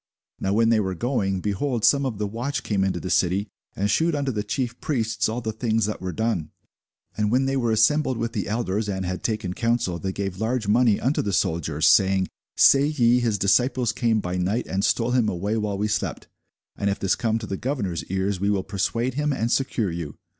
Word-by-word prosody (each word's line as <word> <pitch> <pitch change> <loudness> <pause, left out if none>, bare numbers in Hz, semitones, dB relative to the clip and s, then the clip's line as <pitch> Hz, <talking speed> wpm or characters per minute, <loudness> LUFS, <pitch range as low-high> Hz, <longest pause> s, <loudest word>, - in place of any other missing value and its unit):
Now 95 - -1
when 115 +2 +3
they 115 -1 +4
were 95 -3 -1
going, 95 -4 -1
behold, 110 +4 -1
some 140 +3 +4
of 115 -5 -4
the 105 - -1
watch 120 +7 -3
came 100 -3 0
into 95 -1 0
the 95 - -5
city, 95 +3 +1 0.3
and 100 - 0
shewed 160 +9 +2
unto 140 -2 -1
the 105 -3 -2
chief 120 +3 -3
priests 115 -7 0
all 115 +3 -3
the 110 -1 -2
things 110 -1 0
that 105 - -4
were 95 0 -3
done. 110 -8 -1 0.7
And 105 -1 0
when 130 +2 +3
they 135 0 0
were 120 -3 0
assembled 130 +4 +3
with 115 0 -3
the 105 - -2
elders, 105 -1 -1
and 95 -1 -2
had 90 +1 -3
taken 110 -5 -2
counsel, 115 -6 0
they 95 +3 -3
gave 95 -1 -4
large 115 -1 -1
money 115 0 +3
unto 135 +5 +1
the 100 - -2
soldiers, 80 -3 0
saying, 95 +1 +4 0.3
Say 140 0 +6
ye, 125 -5 +3
His 115 -4 0
disciples 120 +5 +2
came 115 -3 +1
by 90 0 -3
night, 100 +7 0
and 95 +1 -2
stole 115 +3 +1
him 120 -4 +2
away 100 +5 -2
while 105 -2 -1
we 105 +2 0
slept. 105 - -3 0.5
And 100 - -1
if 100 - -1
this 95 -2 +1
come 115 -2 0
to 110 - -5
the 100 - -3
governor's 100 - -3
ears, 95 +1 -1
we 100 +2 0
will 100 -2 +1
persuade 115 +6 -1
him, 150 +2 0
and 120 -3 -1
secure 120 -8 0
you. 85 -4 -5
110 Hz, 220 wpm, -24 LUFS, 95-120 Hz, 0.7 s, Say